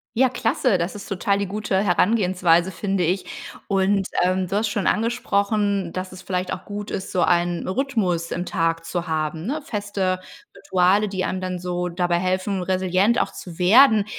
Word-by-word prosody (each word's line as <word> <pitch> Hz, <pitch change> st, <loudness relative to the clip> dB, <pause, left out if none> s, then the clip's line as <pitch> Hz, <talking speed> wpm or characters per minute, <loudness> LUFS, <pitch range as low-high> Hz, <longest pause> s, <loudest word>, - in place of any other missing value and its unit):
Ja, 260 Hz, +3 st, +4 dB
klasse. 240 Hz, -3 st, +1 dB
Das 170 Hz, +3 st, -2 dB
ist 200 Hz, -1 st, -8 dB
total 195 Hz, +1 st, 0 dB
die 200 Hz, -, -1 dB
gute 200 Hz, 0 st, -2 dB
Herangehensweise, 180 Hz, -3 st, +2 dB
finde 195 Hz, 0 st, -1 dB
ich. 180 Hz, +3 st, -1 dB, 0.4 s
Und, 195 Hz, 0 st, +1 dB, 0.2 s
ähm, 185 Hz, +1 st, +1 dB
du 190 Hz, -, -3 dB
hast 215 Hz, +1 st, +1 dB
schon 205 Hz, -2 st, -1 dB
angesprochen, 205 Hz, -4 st, 0 dB
dass 185 Hz, 0 st, -4 dB
es 185 Hz, -, -11 dB
vielleicht 185 Hz, -1 st, -2 dB
auch 185 Hz, -, -5 dB
gut 205 Hz, 0 st, -6 dB
ist, 190 Hz, -, -4 dB
so 185 Hz, -, +1 dB
ein 175 Hz, 0 st, +1 dB
Rhythmus 190 Hz, -7 st, -1 dB
im 175 Hz, +1 st, -2 dB
Tag 165 Hz, -1 st, -1 dB
zu 175 Hz, +1 st, -3 dB
haben, 160 Hz, +1 st, -2 dB
ne? 295 Hz, +7 st, -2 dB
Feste 205 Hz, -6 st, -2 dB, 0.4 s
Rituale, 190 Hz, +3 st, +2 dB
die 190 Hz, -1 st, -2 dB
einem 185 Hz, -, -3 dB
dann 185 Hz, -1 st, -3 dB
so 180 Hz, 0 st, -2 dB
dabei 175 Hz, 0 st, 0 dB
helfen, 185 Hz, +1 st, -1 dB
resilient 185 Hz, +5 st, +2 dB
auch -, -, -2 dB
zu 170 Hz, -3 st, -10 dB
werden. 220 Hz, +3 st, +6 dB
185 Hz, 180 wpm, -22 LUFS, 180-205 Hz, 0.4 s, werden